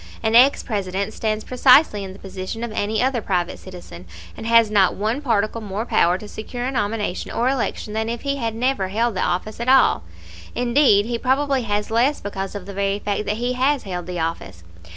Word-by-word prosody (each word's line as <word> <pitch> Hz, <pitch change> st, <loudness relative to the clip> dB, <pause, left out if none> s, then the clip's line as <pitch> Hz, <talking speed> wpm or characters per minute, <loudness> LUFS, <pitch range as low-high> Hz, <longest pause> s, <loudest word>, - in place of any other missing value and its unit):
An 220 Hz, 0 st, +1 dB
ex 255 Hz, +4 st, +6 dB
President 200 Hz, -1 st, -3 dB
stands 215 Hz, -1 st, -2 dB
precisely 250 Hz, -4 st, +4 dB
in 190 Hz, -, -7 dB
the 190 Hz, -, -12 dB
position 195 Hz, +3 st, -6 dB
of 235 Hz, -, -4 dB
any 215 Hz, +2 st, -1 dB
other 255 Hz, -2 st, 0 dB
private 180 Hz, -3 st, -2 dB
citizen, 175 Hz, -, -11 dB, 0.3 s
and 225 Hz, -, -7 dB
has 230 Hz, -2 st, +5 dB
not 195 Hz, -3 st, +3 dB
one 220 Hz, +7 st, -1 dB
particle 230 Hz, -4 st, 0 dB
more 210 Hz, +1 st, -4 dB
power 175 Hz, -6 st, +2 dB
to 210 Hz, -, -10 dB
secure 240 Hz, +4 st, -6 dB
a 260 Hz, -, -1 dB
nomination 205 Hz, -5 st, -2 dB
or 240 Hz, -, 0 dB
election 250 Hz, -5 st, -2 dB
than 220 Hz, +1 st, -1 dB
if 235 Hz, 0 st, -4 dB
he 280 Hz, 0 st, -2 dB
had 230 Hz, -4 st, -3 dB
never 245 Hz, -4 st, 0 dB
held 230 Hz, +4 st, 0 dB
the -, -, -1 dB
office 200 Hz, +5 st, -2 dB
at 235 Hz, +2 st, -1 dB
all 265 Hz, 0 st, +5 dB, 0.5 s
indeed, 240 Hz, -4 st, +3 dB
he 235 Hz, 0 st, -3 dB
probably 270 Hz, +1 st, +1 dB
has 210 Hz, -1 st, -2 dB
less 250 Hz, +6 st, +2 dB
because 195 Hz, -1 st, -5 dB
of 200 Hz, -3 st, -6 dB
the 200 Hz, -, -8 dB
very 200 Hz, 0 st, 0 dB
fact 205 Hz, 0 st, -3 dB
that 210 Hz, -, -1 dB
he 245 Hz, +2 st, -1 dB
has 265 Hz, +3 st, +1 dB
held 180 Hz, -3 st, -5 dB
the 180 Hz, -1 st, -4 dB
office. 95 Hz, -, -4 dB
215 Hz, 210 wpm, -21 LUFS, 195-245 Hz, 0.5 s, ex